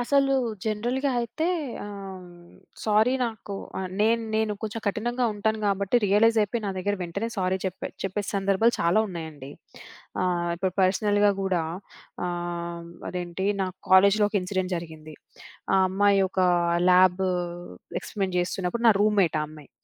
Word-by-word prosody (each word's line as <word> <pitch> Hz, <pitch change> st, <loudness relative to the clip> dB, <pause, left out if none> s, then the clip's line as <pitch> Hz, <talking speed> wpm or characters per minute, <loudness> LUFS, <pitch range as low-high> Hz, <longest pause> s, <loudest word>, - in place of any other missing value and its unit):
అసలు 275 Hz, +2 st, +2 dB, 0.3 s
జనరల్‌గా 240 Hz, +6 st, -1 dB
అయితే, 275 Hz, +8 st, -2 dB, 0.4 s
ఆహ్, 195 Hz, -2 st, -8 dB, 0.6 s
సారీ 220 Hz, +4 st, +3 dB
నాకు 215 Hz, -3 st, -5 dB, 0.2 s
ఆహ్, 185 Hz, -1 st, -4 dB
నేను 230 Hz, +2 st, +3 dB
నేను 220 Hz, -1 st, +1 dB
కొంచెం 220 Hz, +1 st, -4 dB
కఠినంగా 240 Hz, +4 st, 0 dB
ఉంటాను 220 Hz, +1 st, 0 dB
గాబట్టి 200 Hz, +2 st, +1 dB
రియలైజైపోయి 215 Hz, +2 st, +3 dB
నా 200 Hz, -, -1 dB
దగ్గర 205 Hz, +2 st, 0 dB
వెంటనే 200 Hz, +7 st, -3 dB
సారీ 185 Hz, 0 st, +1 dB
చెప్పే 190 Hz, -1 st, -3 dB, 0.2 s
చెప్పే 195 Hz, +2 st, -2 dB
సందర్భాలు 200 Hz, +4 st, +2 dB
చాలా 170 Hz, +5 st, +3 dB
ఉన్నాయండి. 160 Hz, -6 st, -7 dB, 0.7 s
ఆహ్, 175 Hz, -1 st, 0 dB
ఇప్పుడు 185 Hz, +1 st, -1 dB
పర్సనల్‌గా 205 Hz, +2 st, +3 dB
గూడా, 185 Hz, -3 st, 0 dB, 0.6 s
ఆహ్, 170 Hz, -1 st, -4 dB, 0.2 s
అదేంటి 180 Hz, +1 st, -3 dB, 0.2 s
నా -, -, 0 dB, 0.2 s
కాలేజ్‌లో 200 Hz, +3 st, +6 dB
ఒక 210 Hz, -, -2 dB
ఇన్సిడెంట్ 185 Hz, 0 st, -2 dB
జరిగింది. 155 Hz, -2 st, -9 dB, 0.6 s
ఆ -, -, +5 dB
అమ్మాయి 195 Hz, +1 st, +3 dB
ఒక్క 190 Hz, -, -2 dB, 0.5 s
ల్యాబు 185 Hz, +1 st, +4 dB, 0.7 s
ఎక్స్‌పెరిమెంట్ 190 Hz, -3 st, -3 dB
చేస్తున్నప్పుడు 180 Hz, +5 st, -2 dB
నా -, -, +8 dB
రూమ్‌మేట్ 205 Hz, -6 st, +3 dB
ఆ -, -, -1 dB
అమ్మాయి. 155 Hz, -2 st, -14 dB
195 Hz, 135 wpm, -26 LUFS, 180-215 Hz, 0.7 s, నా